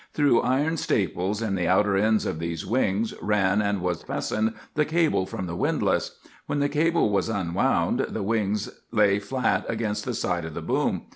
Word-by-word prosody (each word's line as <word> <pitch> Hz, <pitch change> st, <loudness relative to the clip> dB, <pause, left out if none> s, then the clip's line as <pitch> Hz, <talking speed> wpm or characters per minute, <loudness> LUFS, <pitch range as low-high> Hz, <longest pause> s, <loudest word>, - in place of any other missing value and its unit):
Through 145 Hz, -5 st, +3 dB
iron 145 Hz, +6 st, +1 dB
staples, 100 Hz, -, -1 dB
in 110 Hz, -3 st, -1 dB
the 90 Hz, -3 st, 0 dB
outer 100 Hz, +3 st, +3 dB
ends 110 Hz, +2 st, +2 dB
of 80 Hz, -, -3 dB
these 85 Hz, -1 st, -4 dB
wings, 110 Hz, -2 st, 0 dB
ran 105 Hz, -1 st, +2 dB
and 100 Hz, -2 st, 0 dB
was 90 Hz, -2 st, -1 dB
fastened 110 Hz, +1 st, -2 dB, 0.2 s
the 150 Hz, -, +2 dB
cable 155 Hz, -, +1 dB
from 95 Hz, -, -5 dB
the 85 Hz, -1 st, -5 dB
windlass. -, -, 0 dB, 0.3 s
When -, -, -1 dB
the 145 Hz, 0 st, +1 dB
cable 155 Hz, -4 st, +2 dB
was 100 Hz, +2 st, +1 dB
unwound, 95 Hz, -6 st, +1 dB
the 110 Hz, -, -3 dB
wings 105 Hz, -1 st, 0 dB, 0.2 s
lay 105 Hz, -3 st, +3 dB
flat 125 Hz, +4 st, 0 dB
against 110 Hz, -2 st, -2 dB
the -, -, -2 dB
side 85 Hz, -1 st, -1 dB
of 80 Hz, -1 st, -7 dB
the -, -, -4 dB
boom. -, -, 0 dB
105 Hz, 185 wpm, -25 LUFS, 95-115 Hz, 0.3 s, Through